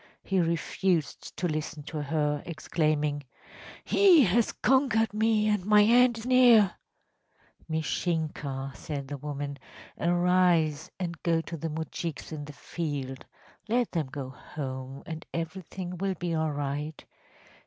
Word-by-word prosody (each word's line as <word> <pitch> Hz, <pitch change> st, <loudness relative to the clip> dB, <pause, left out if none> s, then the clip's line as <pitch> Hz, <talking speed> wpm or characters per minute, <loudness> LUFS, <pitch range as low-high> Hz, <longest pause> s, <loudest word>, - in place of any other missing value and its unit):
He 190 Hz, -1 st, +1 dB
refused 170 Hz, -1 st, -1 dB
to 180 Hz, -, 0 dB
listen 155 Hz, -1 st, -3 dB
to 150 Hz, 0 st, -5 dB
her, 150 Hz, 0 st, 0 dB
exclaiming: 155 Hz, -2 st, -1 dB, 0.6 s
“He 370 Hz, -7 st, +6 dB
has 225 Hz, +3 st, +2 dB
conquered 250 Hz, -5 st, +2 dB
me, 215 Hz, 0 st, +2 dB
and 210 Hz, -3 st, +1 dB
my 210 Hz, +1 st, +6 dB
end 240 Hz, +2 st, +5 dB
is 225 Hz, -, -7 dB
near!‚ÄĚ 245 Hz, -6 st, +6 dB, 1.0 s
‚ÄúMishinka,‚ÄĚ 155 Hz, -4 st, -2 dB
said 140 Hz, -3 st, -5 dB
the 145 Hz, +1 st, -5 dB
woman, 145 Hz, -1 st, -5 dB, 0.4 s
“arise 175 Hz, -2 st, +2 dB
and 170 Hz, -3 st, -4 dB
go 165 Hz, -1 st, +2 dB
to 165 Hz, -, -7 dB
the 165 Hz, +1 st, -4 dB
moujiks 160 Hz, +1 st, -5 dB
in 150 Hz, -2 st, -5 dB
the 150 Hz, -, -9 dB
field. 140 Hz, -5 st, -5 dB, 0.4 s
Let 240 Hz, +1 st, +1 dB
them 160 Hz, -5 st, -1 dB
go 130 Hz, -1 st, -6 dB
home, 130 Hz, 0 st, -7 dB
and 160 Hz, -1 st, -6 dB
everything 180 Hz, +2 st, -5 dB
will 195 Hz, 0 st, -1 dB
be 175 Hz, 0 st, -3 dB
all 160 Hz, -1 st, 0 dB
right. 145 Hz, +1 st, -4 dB
165 Hz, 130 wpm, -28 LUFS, 145-190 Hz, 1.0 s, He